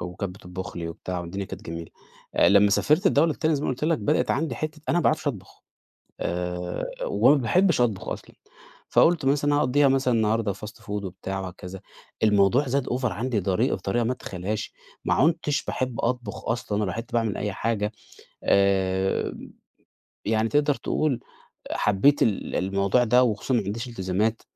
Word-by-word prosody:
وكانت 90 +2 -5
بتطبخ 90 -1 -8
لي 85 -1 -4
وبتاع 90 +2 -5
والدنيا 95 +3 -5
كانت 95 +2 -9
جميلة. 85 -2 -7 0.4
آآ - - +5
لمّا 100 0 +5
سافرت 155 - +3
الدولة 160 -1 +4
التانية 155 +1 0
زي 145 - -2
ما - - -1
قُلت 130 +4 -2
لك، 160 -1 +2
بدأت 150 - +1
عندي 155 +3 0
حِتّة 155 0 -5
أنا 175 - +3
ما - - +1
باعرفش 155 0 +1
أطبخ، 95 -8 -8 0.6
آآ 90 0 -3 0.2
وما 150 - +4
باحبش 170 - +2
أطبخ 110 -6 0
أصلًا، - - -6 0.5
فقُلت 165 -4 +4
مثلًا 145 +2 +2
أنا 145 - +3
أقضيها 140 +2 +3
مثلًا 135 -2 +2
النهاردة 110 -1 +1
fast 105 +2 -9
food - - -20
وبتاع 95 -1 -4
وهكذا، 95 0 -8 0.4
الموضوع 105 +6 +4
زاد 135 +1 0
over 125 -1 -1
عندي 100 +6 +1
بطريقة 100 +6 -1
ما 125 +3 0
تتخيلهاش، 95 +2 -4 0.3
ما - - +2
عُنتش 155 0 +1
باحب 130 -2 -2
أطبخ 120 -3 -3
أصلًا، 115 -3 -1
ولا 105 - +1
باحب 115 +5 -3
أعمل 115 -4 0
أي 105 -1 -2
حاجة 105 0 -1 0.5
آآ 95 -1 +2 0.9
يعني 110 +1 +1
تقدر 145 +1 +2
تقول 145 -4 -1 0.5
حبيت 105 +9 +3
ال 105 -4 -1
الموضوع 100 +5 +2
ده، 125 +2 +4
وخصوصًا 115 +2 -1
ما 120 - +3
عنديش 115 +5 -4
إلتزامات. 105 +1 -1
110 Hz, 165 wpm, -25 LUFS, 95-135 Hz, 0.9 s, آآ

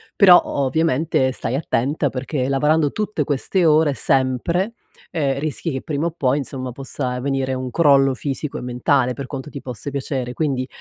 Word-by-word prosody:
però 185 -3 +8
o 140 - -2
ovviamente 145 -1 +1
stai 120 0 -3
attenta 140 +1 0
perché 130 +1 -2
lavorando 150 +2 +2
tutte 210 -7 -2
queste 150 +6 0
ore, 155 -2 +4
sempre, 135 - 0 0.4
ehm, 140 -5 0
rischi 155 +3 -3
che 135 -1 -3
prima 155 0 -1
o - - -3
poi, 140 -4 0
insomma, 130 -2 -5
possa 130 0 -4
venire 135 -1 -1
un 130 0 -3
crollo 140 -4 +4
fisico 140 +2 -4
e - - -6
mentale, 125 +1 +1
per 135 0 -6
quanto 135 +1 -6
ti 140 - -7
possa 125 +2 -6
piacere; 130 -3 -3
quindi 135 -3 -1
140 Hz, 170 wpm, -21 LUFS, 130-155 Hz, 0.4 s, però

